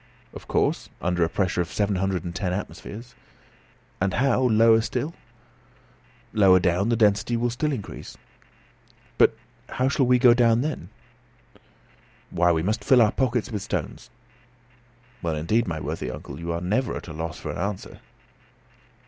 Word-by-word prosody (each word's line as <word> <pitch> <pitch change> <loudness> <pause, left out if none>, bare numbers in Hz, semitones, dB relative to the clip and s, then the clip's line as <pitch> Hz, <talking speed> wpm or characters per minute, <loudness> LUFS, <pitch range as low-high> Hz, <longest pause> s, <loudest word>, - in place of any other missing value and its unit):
"Of - - -11
course, - - 0
under 90 -1 0
a 80 - +1
pressure 90 -1 0
of 85 - -4
seven 100 -2 0
hundred 95 -2 -1
and 85 -1 -5
ten 90 0 -2
atmospheres." 110 +4 -7 0.9
"And 95 -1 +1
how, 130 0 +2
lower 115 -2 +5
down - - +1
still?" 135 +8 -3 1.2
"Lower 95 -4 +6
down 90 +4 +1
the 120 - +2
density 110 +1 +2
will 120 +1 0
still 150 +6 -1
increase." 115 -8 -7 1.0
"But - - +5 0.3
how 130 0 0
shall 140 -3 +1
we 125 0 +5
go 120 -1 +6
down 120 -1 +3
then." 155 +3 -4 1.4
"Why, 85 0 +3
we 80 -1 0
must 105 +5 -1
fill 130 - +5
our 105 - +2
pockets 125 -2 -1
with 105 -3 -3
stones." - - -5 1.1
"Well, 85 -3 -1
indeed, 105 +10 0
my 80 -3 -3
worthy - - -4
uncle, 75 - -8
you 85 0 -4
are 85 0 -3
never 110 +7 -1
at - - -9
a 80 - -7
loss 80 +1 -5
for - - -5
an - - -6
answer." 100 +1 -4
105 Hz, 165 wpm, -24 LUFS, 90-120 Hz, 1.4 s, Lower